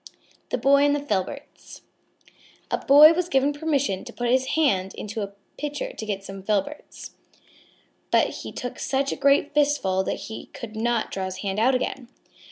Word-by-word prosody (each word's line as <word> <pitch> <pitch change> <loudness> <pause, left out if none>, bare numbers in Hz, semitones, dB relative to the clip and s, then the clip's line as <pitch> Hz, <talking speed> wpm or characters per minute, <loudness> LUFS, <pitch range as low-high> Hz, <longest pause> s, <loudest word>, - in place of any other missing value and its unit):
_ - - -33 0.4
THE - - -1
BOY 280 +1 +4
AND 290 0 +3
THE - - -1
FILBERTS 280 +2 -5 0.9
A - - 0
Boy 300 +3 +8
was 355 +1 -2
given 275 0 +2
permission 285 -10 -1
to - - -9
put 240 0 -2
his 260 +1 +2
hand 195 -12 +1
into 215 +1 -5
a 200 0 -5 0.3
pitcher 295 -1 -4
to 220 - -7
get 195 -2 -3
some 195 0 -8
filberts. 210 +8 -3 1.0
But - - +3
he - - -7
took 245 - -6
such 275 0 -1
a - - -2
great 280 +1 +2
fistful 285 -11 +2
that - - -3
he 220 - -8
could 220 -2 -8
not 230 0 -1
draw 190 -1 -3
his 185 0 -5
hand 195 +1 -1
out 255 +4 +3
again. 250 0 -3
255 Hz, 180 wpm, -24 LUFS, 200-285 Hz, 1.0 s, Boy